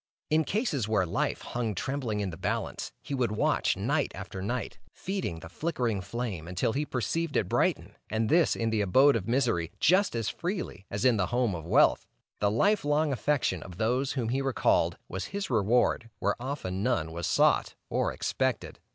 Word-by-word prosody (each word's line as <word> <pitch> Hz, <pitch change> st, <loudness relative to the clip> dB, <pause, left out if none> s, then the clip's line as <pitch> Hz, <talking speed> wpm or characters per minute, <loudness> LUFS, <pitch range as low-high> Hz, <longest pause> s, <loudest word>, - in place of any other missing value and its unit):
In 155 Hz, 0 st, +3 dB
cases 185 Hz, -, 0 dB
where 105 Hz, -4 st, +2 dB
life 85 Hz, -, -1 dB
hung 115 Hz, -4 st, -2 dB
trembling 120 Hz, -2 st, -2 dB
in 95 Hz, -2 st, -2 dB
the -, -, -7 dB
balance, 90 Hz, -, -3 dB
he -, -, -5 dB
would 125 Hz, -5 st, 0 dB
watch -, -, +1 dB
night -, -, 0 dB
after 95 Hz, -, -7 dB
night, 120 Hz, +6 st, -3 dB
feeding 185 Hz, -, -4 dB
the -, -, -8 dB
flickering 120 Hz, -, -2 dB
flame 100 Hz, -5 st, -4 dB
until 90 Hz, +5 st, 0 dB
he 145 Hz, +2 st, -1 dB
perceived 160 Hz, +5 st, -1 dB
it 95 Hz, -, +1 dB
brighten, -, -, 0 dB
and 110 Hz, 0 st, 0 dB
this 165 Hz, +6 st, +4 dB
in 115 Hz, -1 st, -1 dB
the 110 Hz, -1 st, +1 dB
abode 130 Hz, +9 st, +5 dB
of 110 Hz, -3 st, -2 dB
misery 115 Hz, -10 st, +1 dB
just 185 Hz, -2 st, +3 dB
as 115 Hz, -2 st, -1 dB
freely 175 Hz, -, -4 dB
as 100 Hz, +3 st, -2 dB
in 125 Hz, -3 st, +5 dB
the 90 Hz, -3 st, +1 dB
home 120 Hz, -3 st, +1 dB
of 80 Hz, -1 st, -6 dB
wealth. -, -, +4 dB, 0.3 s
The 100 Hz, -, +2 dB
life 200 Hz, -, +2 dB
long 145 Hz, 0 st, +2 dB
affection 130 Hz, -, 0 dB
of 90 Hz, 0 st, -10 dB
those 125 Hz, +6 st, +1 dB
whom 120 Hz, -5 st, -1 dB
he 135 Hz, +3 st, 0 dB
recalled, 135 Hz, -2 st, +2 dB
was 95 Hz, +2 st, -4 dB
his 195 Hz, -5 st, -4 dB
reward 115 Hz, +1 st, +2 dB
where 100 Hz, -, +1 dB
often 120 Hz, -9 st, -3 dB
none 100 Hz, -9 st, 0 dB
was 85 Hz, +1 st, -3 dB
sought -, -, +3 dB
or -, -, 0 dB
expected. -, -, -2 dB
115 Hz, 185 wpm, -29 LUFS, 100-140 Hz, 0.3 s, abode